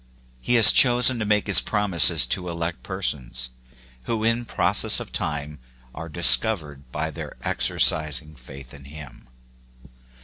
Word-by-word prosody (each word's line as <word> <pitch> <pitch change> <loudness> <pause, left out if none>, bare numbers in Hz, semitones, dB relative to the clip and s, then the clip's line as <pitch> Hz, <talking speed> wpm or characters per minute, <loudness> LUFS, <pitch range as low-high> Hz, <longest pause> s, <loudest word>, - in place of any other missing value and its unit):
He 120 - -3
has 115 -3 +7
chosen 125 -1 +3
to 110 - -5
make 105 0 -2
his 100 - +5
promises 85 - +2
to 90 +8 -4
elect 85 0 -7
persons, 65 -10 -6 0.5
who 110 +5 -5
in 115 +1 -2
process - - +1
of - - -11
time 75 0 -6 0.3
are 80 - -11
discovered 75 - +2
by 80 +3 -6
their - - -11
exercising 75 -1 -1
faith 65 -1 -16
in 70 -1 -16
him. 70 -4 -15
80 Hz, 135 wpm, -20 LUFS, 70-105 Hz, 0.5 s, has